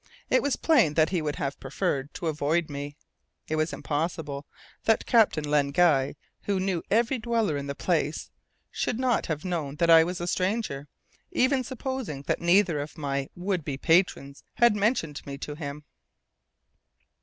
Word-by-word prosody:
It - - +5
was 285 -1 0
plain 240 - +3
that 155 -1 +4
he 180 -4 0
would 150 -1 -2
have 140 - -3
preferred 135 +1 -2
to - - -5
avoid 155 +1 0
me. 145 +1 -5 0.5
It 155 - -1
was 155 +1 0
impossible 150 -2 -3 0.4
that 225 - +3
Captain 220 -10 +4
Len 145 -1 +2
Guy, 140 -4 +3 0.3
who 200 -2 0
knew 185 -3 -1
every 235 +4 +2
dweller 225 -7 0
in 140 0 -4
the 140 - -4
place, 160 -3 -1 0.4
should 235 - -1
not 255 -2 +1
have 155 0 -3
known 160 -6 -2
that 170 +1 +3
I 165 0 +9
was 180 +2 -3
a 175 - -3
stranger, 185 -6 -1 0.4
even 260 +1 +2
supposing 255 - -5
that - - -1
neither 175 -2 +3
of 145 +1 -6
my 140 -2 -2
would 180 -1 -2
be 140 -2 -4
patrons 150 -4 +1
had 240 -3 +5
mentioned 200 - 0
me 140 -1 -5
to 150 - -6
him. 145 -1 -6
165 Hz, 165 wpm, -27 LUFS, 145-200 Hz, 0.5 s, I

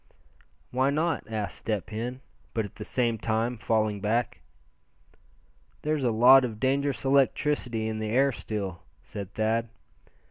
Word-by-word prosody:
"Why 130 +2 +2
not?" 155 +2 0
asked 105 -4 -3
Step 105 -3 -3
Hen, 120 +4 -4 0.3
but 110 -2 0
at 100 - -10
the 105 - -8
same 115 -1 0
time 115 +2 -1
falling 110 -2 0
back. 115 +4 0 1.4
"There's 150 -2 0
a 125 - +3
lot 125 +4 +7
of 110 -4 -4
dangerous 140 +2 0
electricity 135 -4 +2
in 110 -1 -3
the 110 0 -2
air 135 +5 +3
still," 100 -7 -4 0.2
said 100 -3 -8
Thad. 110 +1 0
115 Hz, 140 wpm, -27 LUFS, 110-130 Hz, 1.4 s, lot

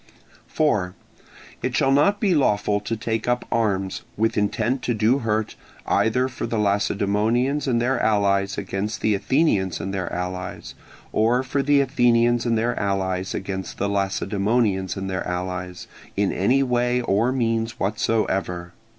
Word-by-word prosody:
4. 105 -12 0 0.7
It - - -2
shall 135 - +3
not 200 +9 +3
be 200 -5 +2
lawful 105 -8 +2
to 110 +2 -4
take 110 0 -2
up 120 0 0
arms, 100 -4 0 0.2
with 110 +1 +1
intent 120 +5 0
to 120 - -1
do 110 +5 +2
hurt, 110 -3 -1 0.3
either 125 +3 +2
for 130 - -5
the 115 - -2
Lacedaemonians 105 +7 +1
and 120 -3 +2
their 125 +1 +1
allies 100 -2 +1
against 100 +2 -3
the 110 - +2
Athenians 100 - +1
and 95 - -4
their 95 -3 -3
allies, 90 +1 -5 0.4
or 120 +4 +2
for 140 +2 -1
the 140 0 +4
Athenians 120 -2 +2
and 115 -1 +2
their 120 +2 0
allies 95 -2 -1
against 95 -1 -5
the 100 - -1
Lacedaemonians 100 0 0
and 95 0 -4
their 95 -1 -3
allies, 90 0 -4 0.3
in 100 -1 +2
any 125 +8 +2
way 125 -1 +1
or 115 +2 +1
means 115 -2 -1
whatsoever. 95 -4 -1
110 Hz, 150 wpm, -23 LUFS, 95-120 Hz, 0.7 s, the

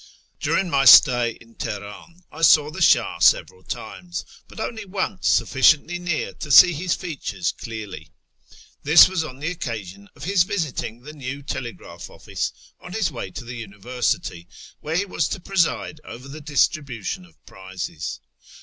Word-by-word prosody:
During 195 - 0
my 140 -5 +1
stay 120 -2 +7
in 115 0 -19
Teheran 110 - -8
I 160 - -10
saw 150 -2 +5
the - - -7
Shah - - +3
several 95 - +3
times, 175 - -7 0.2
but - - -12
only 220 0 -4
once 190 -1 -3
sufficiently 155 +6 +3
near 175 -3 -3
to 150 - -8
see 175 +5 +8
his 170 +3 -1
features 135 - -4
clearly. 105 - -8 0.7
This 155 +3 +8
was 185 -3 -2
on 130 -5 -8
the 150 +5 -3
occasion 100 - -7
of 145 - -12
his 190 +3 +2
visiting 160 - -2
the 150 +3 -10
new 140 -1 -7
telegraph 130 -4 -7
office - - -4 0.3
on 180 - -11
his 220 -1 0
w^ay 115 - -7
to - - -6
the 120 +1 -7
University, 105 -5 -3 0.3
where 155 +2 -4
he 195 +4 +1
was 190 - -1
to - - -4
preside 170 -4 -1
over 125 +3 -10
the 150 +3 -9
distribution 145 - -1
of 170 -2 -21
prizes. 95 -4 -7
145 Hz, 160 wpm, -22 LUFS, 115-175 Hz, 0.7 s, see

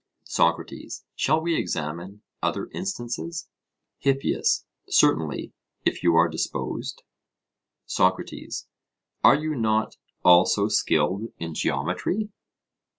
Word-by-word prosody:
SOCRATES: - - -1
Shall 155 +3 +2
we 170 0 0
examine 85 - -3 0.2
other - - -1
instances? 170 -1 -4 0.5
HIPPIAS: 135 0 +1 0.2
Certainly, 80 -2 +2 0.3
if - - +1
you 85 -1 +4
are 85 +1 +6
disposed. 80 -1 -3 0.8
SOCRATES: - - 0 0.6
Are - - +8
you 155 +1 -1
not 110 -4 0 0.3
also 95 +4 +6
skilled 100 +2 +1
in 85 -1 -5
geometry? 210 - -1
110 Hz, 90 wpm, -25 LUFS, -, 0.8 s, Are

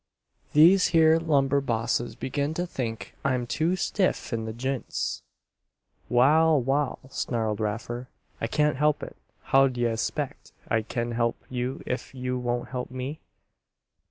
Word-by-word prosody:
These 175 +5 +7
here 160 -1 +5
lumber 140 -4 +2
bosses 120 -1 -1
begin 140 +4 -2
to 175 - -1
think 120 -9 -5
I'm 130 -3 +1
too 160 +8 0
stiff 185 - 0
in 115 -1 -2
the 110 - -3
j'ints." 130 +2 -3 0.9
"Wal, 150 +5 +5
wal!" 135 +2 0
snarled 110 -5 -1
Raffer. 115 +3 -3 0.3
"I 115 - 0
can't 150 +2 +1
help 150 +1 +2
it. - - -7 0.3
How 135 0 +5
d'ye 120 -2 0
expec' 115 -1 -3 0.2
I 115 - +2
kin 120 +2 -3
help 115 0 0
you 125 +1 -3
ef 125 +1 -4
you 125 0 -2
won't 120 0 -2
help 125 -1 -4
me?" 130 +4 -5
130 Hz, 140 wpm, -27 LUFS, 120-150 Hz, 0.9 s, These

